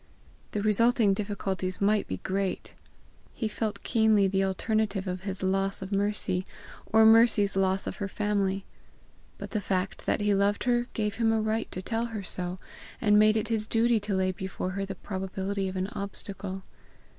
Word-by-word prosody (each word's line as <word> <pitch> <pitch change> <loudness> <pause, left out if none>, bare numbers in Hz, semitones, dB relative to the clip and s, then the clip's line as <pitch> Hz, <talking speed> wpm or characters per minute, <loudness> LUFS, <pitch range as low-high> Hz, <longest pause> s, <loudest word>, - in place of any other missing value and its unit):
The 205 - -1
resulting 220 0 +3
difficulties 195 -2 -3
might 205 +1 +2
be 95 - -3
great; 190 - -3 0.6
he 225 - -1
felt 215 0 -3
keenly 220 -4 +3
the 190 0 0
possible 195 - +2
alternative 200 0 -1
of 180 -1 -4
his 195 -1 -4
loss 195 +1 0
of 190 - -8
Mercy, 200 -2 0 0.4
or 220 0 +5
Mercy's 220 -3 +5
loss 190 0 +1
of - - -5
her 200 - -3
family; 195 -1 -1 0.7
but - - -8
the 215 - -1
fact 190 -1 -2
that - - +2
he 205 0 +2
loved 200 +1 +1
her 240 0 +1
gave 210 -1 -1
him 225 -1 +2
a 225 - +2
right 220 +1 -1
to 185 - -4
tell 225 +4 -1
her 220 -3 -5
so, 180 0 -2 0.4
and 210 -2 +4
made 215 +1 +5
it 215 - -1
his 215 -2 0
duty 230 0 +3
to 205 -1 -2
lay 185 0 +1
before 185 0 -4
her 195 +1 -3
the 195 - -5
probability 190 +1 -3
of 185 - -5
an 185 - 0
obstacle. 195 -1 -5
200 Hz, 180 wpm, -28 LUFS, 190-215 Hz, 0.7 s, or